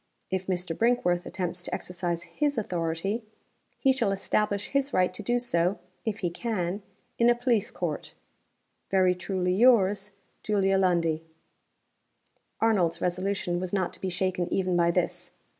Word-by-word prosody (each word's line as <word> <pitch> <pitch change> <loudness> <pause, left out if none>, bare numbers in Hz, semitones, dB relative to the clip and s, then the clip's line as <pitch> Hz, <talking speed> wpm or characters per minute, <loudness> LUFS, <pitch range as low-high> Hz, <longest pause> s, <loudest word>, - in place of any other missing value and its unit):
If 190 0 -2
Mr. 180 -3 -1
Brinkworth 180 -7 +2
attempts 180 -1 -3
to - - -3
exercise 175 -1 -3
his 290 +8 -1
authority, 180 +2 -1 0.6
he 270 - +4
shall 235 -6 +1
establish 200 +1 0
his 275 0 0
right 185 0 +3
to 200 - -7
do 240 +4 +1
so 185 -6 +1 0.3
(if 220 -1 -2
he 175 -3 0
can) 195 -2 -2 0.4
in 235 0 +6
a 240 - +5
police 240 -4 +1
court. 165 -5 -4 0.7
"Very 185 -1 +4
truly 180 0 -1
yours, 205 -2 +4 0.3
JULIA 195 -2 +2
LUNDIE." 170 -4 +2 1.4
Arnold's 205 -7 +2
resolution 180 0 -1
was 185 0 -4
not 185 -3 0
to - - -13
be 190 - -1
shaken 185 -1 -1
even 185 -2 +1
by 170 -1 +4
this. 170 - -1
190 Hz, 145 wpm, -28 LUFS, 175-215 Hz, 1.4 s, in